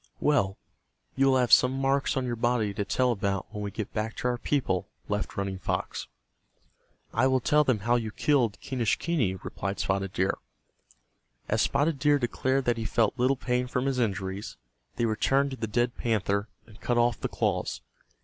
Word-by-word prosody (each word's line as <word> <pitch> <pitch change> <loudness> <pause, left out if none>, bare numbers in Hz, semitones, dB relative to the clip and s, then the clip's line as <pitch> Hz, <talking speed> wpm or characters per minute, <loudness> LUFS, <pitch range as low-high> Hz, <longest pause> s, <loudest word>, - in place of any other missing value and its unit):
"Well, 100 -11 +2 0.6
you 135 0 +3
will 130 -1 +4
have 125 -2 +1
some 125 - +7
marks 135 +1 +1
on 130 - 0
your 120 -1 -2
body 115 -3 +1
to 105 +1 -2
tell 125 +5 +1
about 100 -3 -1
when 105 - -4
we 100 - -3
get 105 +1 -5
back 110 +1 -2
to - - -2
our 120 -1 -2
people," 105 -13 0 0.2
laughed 105 0 -3
Running 100 -1 -2
Fox. 85 - -3 1.1
"I 125 +4 +3
will 130 0 +3
tell 150 +4 +3
them 130 -8 +1
how 120 +3 +2
you 115 -2 -3
killed 120 -2 +1
Quenischquney," 125 - 0
replied 100 0 -4
Spotted 95 0 -1
Deer. 95 +2 0 1.1
As - - +1
Spotted 145 +1 +1
Deer 145 0 +4
declared 130 +1 0
that 120 -1 +2
he 115 - -3
felt 115 +3 +1
little 130 +2 +3
pain 125 0 -1
from 125 +1 -1
his 135 -2 0
injuries, 95 - -2 0.4
they 120 - +1
returned 135 +5 +2
to 130 - -5
the 110 - -3
dead 120 +3 0
panther 100 -2 0 0.2
and 110 -1 -17
cut 120 - 0
off 120 -2 +2
the - - -2
claws. - - -1
120 Hz, 185 wpm, -28 LUFS, 105-130 Hz, 1.1 s, some